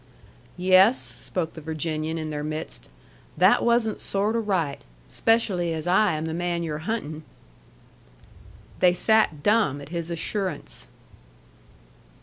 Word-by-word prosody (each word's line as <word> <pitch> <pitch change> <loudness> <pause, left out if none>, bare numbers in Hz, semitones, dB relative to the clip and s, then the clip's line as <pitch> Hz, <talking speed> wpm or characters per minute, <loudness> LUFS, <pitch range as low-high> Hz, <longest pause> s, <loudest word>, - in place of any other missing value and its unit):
"Yes," 185 +6 +5
spoke 165 -3 -4
the 160 - -9
Virginian 160 +1 -3
in 155 -1 -4
their 150 0 -4
midst, 155 +1 -6 0.5
"that - - +5
wasn't 235 -2 +1
sort 205 +3 0
o' - - +2
right. 185 -10 -1 0.3
Especially 190 -7 +1
as 155 - -4
I 185 +1 +3
am 155 +1 -3
the 160 - -3
man 175 0 -2
you're 155 -2 -3
huntin'." 155 -9 -3 1.6
They 180 -1 +5
sat 180 -6 +2
dumb 205 -10 +2
at 140 - -10
his 170 0 -4
assurance. 170 - -4
170 Hz, 130 wpm, -25 LUFS, 155-205 Hz, 1.6 s, Yes